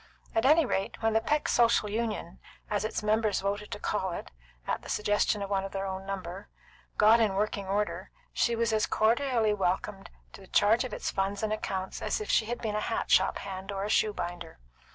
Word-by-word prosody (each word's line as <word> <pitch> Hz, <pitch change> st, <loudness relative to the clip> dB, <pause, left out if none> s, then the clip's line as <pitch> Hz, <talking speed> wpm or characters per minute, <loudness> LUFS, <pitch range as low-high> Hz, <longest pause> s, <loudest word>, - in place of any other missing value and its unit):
At 225 Hz, +1 st, +1 dB
anyrate, 285 Hz, -11 st, +2 dB
when 225 Hz, 0 st, +2 dB
the 225 Hz, -, +3 dB
Peck 300 Hz, +4 st, 0 dB
Social 235 Hz, -3 st, +3 dB
Union, 210 Hz, -5 st, -3 dB, 0.3 s
as 205 Hz, -1 st, 0 dB
its 215 Hz, 0 st, -3 dB
members 215 Hz, 0 st, +2 dB
voted 205 Hz, +1 st, -2 dB
to 205 Hz, -, -5 dB
call 190 Hz, -5 st, -1 dB
it, -, -, -7 dB, 0.3 s
at -, -, -2 dB
the -, -, -11 dB
suggestion 205 Hz, 0 st, +1 dB
of 200 Hz, -, -6 dB
one 195 Hz, -1 st, +1 dB
of 195 Hz, -, -6 dB
their 195 Hz, 0 st, -2 dB
own 190 Hz, 0 st, -5 dB
number, 190 Hz, 0 st, -6 dB, 0.5 s
got 220 Hz, +2 st, +6 dB
in 215 Hz, -4 st, +2 dB
working 200 Hz, -1 st, -1 dB
order, 205 Hz, +2 st, -1 dB, 0.2 s
she 235 Hz, -, +2 dB
was 230 Hz, -1 st, 0 dB
as 215 Hz, -1 st, +2 dB
cordially 230 Hz, -1 st, +2 dB
welcomed 195 Hz, +1 st, -2 dB, 0.2 s
to -, -, -11 dB
the 190 Hz, -, -14 dB
charge 220 Hz, +7 st, +4 dB
of 255 Hz, -, -5 dB
its -, -, -3 dB
funds 195 Hz, +2 st, -1 dB
and 215 Hz, 0 st, 0 dB
accounts 190 Hz, -3 st, -4 dB
as -, -, -1 dB
if 425 Hz, -, -3 dB
she 220 Hz, -, +3 dB
had 240 Hz, +2 st, -3 dB
been 215 Hz, -2 st, -1 dB
a 210 Hz, -, 0 dB
hat -, -, -2 dB
shop -, -, +4 dB
hand 190 Hz, 0 st, -6 dB
or 195 Hz, 0 st, -3 dB
a 205 Hz, -, -3 dB
shoe 215 Hz, -, +3 dB
binder. 175 Hz, -4 st, -6 dB
210 Hz, 215 wpm, -29 LUFS, 195-225 Hz, 0.5 s, got